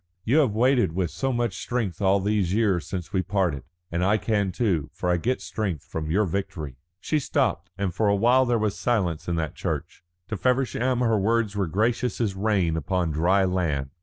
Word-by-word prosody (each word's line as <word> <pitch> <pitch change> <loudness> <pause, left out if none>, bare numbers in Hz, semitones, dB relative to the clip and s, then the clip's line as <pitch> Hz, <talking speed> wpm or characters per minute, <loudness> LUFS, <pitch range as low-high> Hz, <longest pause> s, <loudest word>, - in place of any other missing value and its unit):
You 125 +9 +2
have 125 -9 +2
waited 120 -6 +3
with 90 -2 -1
so 135 0 -1
much 120 -6 -1
strength 110 -9 -2
all 100 0 +4
these 100 -2 0
years 100 -7 +1
since 90 -1 -5
we 95 - +2
parted. 90 -7 0 0.3
And 85 +2 0
I 100 +3 +3
can 105 -3 0
too, 90 - 0
for 90 - -1
I 90 - +2
get 125 +9 -1
strength 95 - -3
from 80 -1 -5
your 100 +6 +2
victory." 80 -7 -4 0.2
She 155 +9 0
stopped, 120 - 0
and 100 -3 -1
for 105 +4 +1
a 100 - +3
while 125 +5 +4
there 120 -1 +2
was 105 -2 0
silence 95 -10 -1
in 85 - 0
that 80 -3 -2
church. - - -4 0.3
To 110 - -2
Feversham 125 +1 +1
her 115 -3 +2
words 110 0 +1
were 100 -3 0
gracious 115 +6 0
as 110 -5 0
rain 95 -5 +1
upon 85 +2 -1
dry 90 +6 +3
land. 80 -8 -1
100 Hz, 200 wpm, -25 LUFS, 90-115 Hz, 0.3 s, all